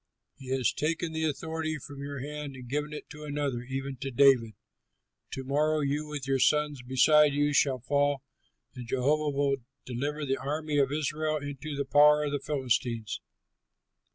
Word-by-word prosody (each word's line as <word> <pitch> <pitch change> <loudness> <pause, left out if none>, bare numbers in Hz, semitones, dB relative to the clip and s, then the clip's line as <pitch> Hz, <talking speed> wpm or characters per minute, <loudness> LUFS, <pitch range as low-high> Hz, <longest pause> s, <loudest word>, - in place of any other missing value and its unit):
He 135 - -13
has 130 -2 +1
taken 165 +2 -1
the 160 0 -1
authority 155 +1 -2
from 140 0 -10
your 140 -1 -5
hand 145 0 -6
and 125 -1 -10
given 150 +4 -2
it 150 - -7
to 150 0 -9
another, 145 -4 -2
even 135 +1 -5
to 135 +2 -4
David. 125 -4 +4 0.8
To 135 - -4
morrow 150 +3 +1
you, 145 +2 -1
with 145 -3 -5
your 135 -1 +1
sons 150 -1 +2
beside 145 +4 +5
you, 145 0 +2
shall 135 -2 +3
fall, 145 +1 +1 0.5
and 125 -3 -8
Jehovah 145 +5 +1
will 140 -1 +1 0.3
deliver 145 +5 -3
the 135 0 0
army 150 +1 -1
of 135 -1 +2
Israel 155 +1 -1
into 145 +1 -6
the 140 - -1
power 150 +2 +6
of 145 - -1
the 145 - -1
Philistines." 125 -6 -1
145 Hz, 170 wpm, -29 LUFS, 135-150 Hz, 0.8 s, power